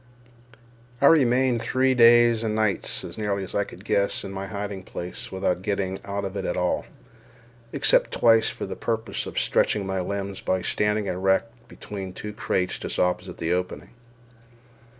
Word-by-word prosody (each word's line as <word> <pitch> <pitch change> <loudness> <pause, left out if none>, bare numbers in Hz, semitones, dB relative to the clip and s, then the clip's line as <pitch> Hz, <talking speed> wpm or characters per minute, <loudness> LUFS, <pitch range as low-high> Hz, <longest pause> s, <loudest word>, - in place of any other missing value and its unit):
I 140 - +3
remained 130 -5 +4
three 130 +2 +2
days 120 -1 +6
and 110 -1 -1
nights 110 -3 +1
(as - - -8
nearly 100 -2 -1
as 95 - -7
I 100 - +1
could 95 +1 -13
guess) 100 -2 +1
in 95 - -6
my 95 0 -5
hiding 100 -2 -5
place 90 -1 -7
without 95 -1 -1
getting 95 -1 -2
out 100 0 -3
of 95 +1 -6
it 100 - -3
at 90 - -2
all, 90 0 0 0.9
except - - +3
twice 115 -1 +4
for - - -5
the - - -6
purpose 115 -1 -3
of - - -8
stretching 105 -2 +1
my 95 -1 -2
limbs 100 +1 -4
by 95 0 -1
standing 105 0 0
erect 95 +4 0
between 95 -4 -8
two 105 +2 -7
crates 90 -3 -1
just - - -5
opposite 90 +1 -1
the 85 +1 -1
opening. 90 0 -3
100 Hz, 170 wpm, -25 LUFS, 95-110 Hz, 0.9 s, days